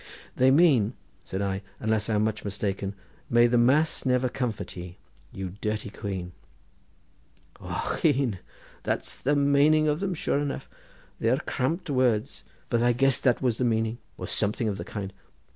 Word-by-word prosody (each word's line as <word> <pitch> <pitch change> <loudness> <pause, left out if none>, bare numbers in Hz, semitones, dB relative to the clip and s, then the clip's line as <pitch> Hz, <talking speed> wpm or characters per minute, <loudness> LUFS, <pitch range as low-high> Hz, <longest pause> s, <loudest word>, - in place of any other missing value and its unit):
"They 130 +1 +5
mean," 135 -7 +4 0.3
said 95 +1 -3
I, 95 0 -1 0.2
"unless 110 0 0
I 110 - +2
am 105 - +2
much 110 -1 -1
mistaken: 100 -1 -3 0.3
'May 120 0 +5
the 120 0 +3
Mass 140 +7 +3
never 125 -1 +2
comfort 125 -4 -3
ye, 90 0 -8 0.3
you 95 -1 -5
dirty 105 -1 -2
quean!'" 95 -5 -5 1.3
"Ochone! 135 - 0 0.4
that's - - -2
the 145 +3 0
maning 145 +2 +4
of 150 +1 +1
them, 190 -2 -1
sure 145 - 0
enough. 145 -1 -3 0.5
They 115 - +1
are 130 - +3
cramped 155 +6 -2
words, 125 -5 +1 0.3
but 115 - +2
I 120 0 +4
guessed 135 +1 +2
that 125 -2 +3
was 120 -3 +1
the - - +2
meaning, 115 0 0 0.2
or - - -5
something 105 +2 0
of 100 -2 -1
the - - -5
kind. 100 -2 -5
120 Hz, 160 wpm, -27 LUFS, 105-135 Hz, 1.3 s, They